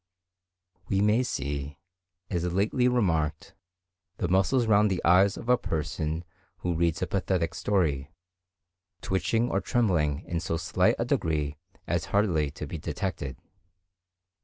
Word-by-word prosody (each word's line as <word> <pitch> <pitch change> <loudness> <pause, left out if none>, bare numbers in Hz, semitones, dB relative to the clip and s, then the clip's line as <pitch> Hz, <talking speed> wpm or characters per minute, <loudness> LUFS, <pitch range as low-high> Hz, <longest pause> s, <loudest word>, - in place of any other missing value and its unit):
We 95 - +2
may 105 +4 +4
see, 70 - -3 0.5
as 90 -1 -1
lately 105 +7 +2
remarked, 85 -12 0 0.6
the 90 - -1
muscles 95 +8 +3
round 105 -1 +4
the 95 -2 -2
eyes 95 +4 +5
of - - -8
a 125 0 +4
person 80 +1 -2 0.4
who 90 - 0
reads 85 -1 0
a - - +2
pathetic 90 -4 -1
story, 75 -10 0 0.9
twitching 95 +6 0
or - - +1
trembling 85 - +1
in 85 - -2
so 80 0 -2
slight 85 - +2
a - - -1
degree 75 -3 0 0.3
as - - -1
hardly 90 -8 +1
to 75 - -7
be 85 - -6
detected. 75 -5 -4
85 Hz, 135 wpm, -28 LUFS, 75-100 Hz, 0.9 s, eyes